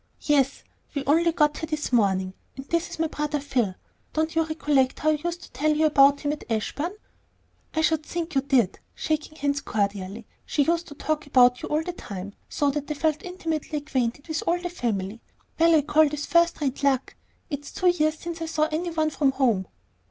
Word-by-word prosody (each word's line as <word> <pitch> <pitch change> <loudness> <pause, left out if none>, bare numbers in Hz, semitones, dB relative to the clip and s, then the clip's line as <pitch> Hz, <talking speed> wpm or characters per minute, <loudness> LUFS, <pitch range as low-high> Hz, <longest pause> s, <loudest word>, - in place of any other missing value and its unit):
"Yes; 280 -3 +2 0.3
we 280 -1 -2
only 330 +5 +4
got 300 -2 +2
here 320 - -4
this 305 -4 -3
morning. 190 -5 +2 0.2
And 270 - -7
this 335 +3 -1
is - - -7
my 325 - +1
brother 300 -1 -2
Phil. 250 -9 0 0.4
Don't 315 +1 0
you 325 - +4
recollect 295 -5 +1
how 310 - +1
I 300 -1 -1
used 345 0 -3
to - - -13
tell 300 +5 +1
you 315 - +4
about 285 -2 +5
him 290 - 0
at 300 - -7
Ashburn?" 290 - -2 0.8
"I 315 - +2
should 315 -1 +2
think 340 +1 -4
you 270 - +3
did," 265 -8 +2 0.2
shaking 310 0 -2
hands 285 -1 0
cordially; 200 +1 -2 0.2
"she 290 - +1
used 335 +3 0
to 290 - -10
talk 310 0 -2
about 250 -2 +5
you - - -5
all 305 +1 +1
the 355 - -4
time, 200 - -7 0.2
so 285 -1 +1
that 290 +1 -4
I 300 - -1
felt 310 0 0
intimately 325 -4 -3
acquainted 280 -2 -2
with 315 -1 -2
all 345 +1 +2
the 355 0 -4
family. 225 - -3 0.4
Well, 330 0 +6
I 300 - +4
call 310 +1 +4
this 295 0 -4
first 340 -1 +3
rate 270 -3 -1
luck. 270 -2 +1 0.4
It's 285 0 -5
two 365 - +2
years 310 -3 +2
since 340 0 -6
I 325 - -2
saw 310 -1 +1
any 340 +3 -1
one 315 -2 0
from 275 -3 +2
home." 235 -9 +1
295 Hz, 210 wpm, -25 LUFS, 265-320 Hz, 0.8 s, Well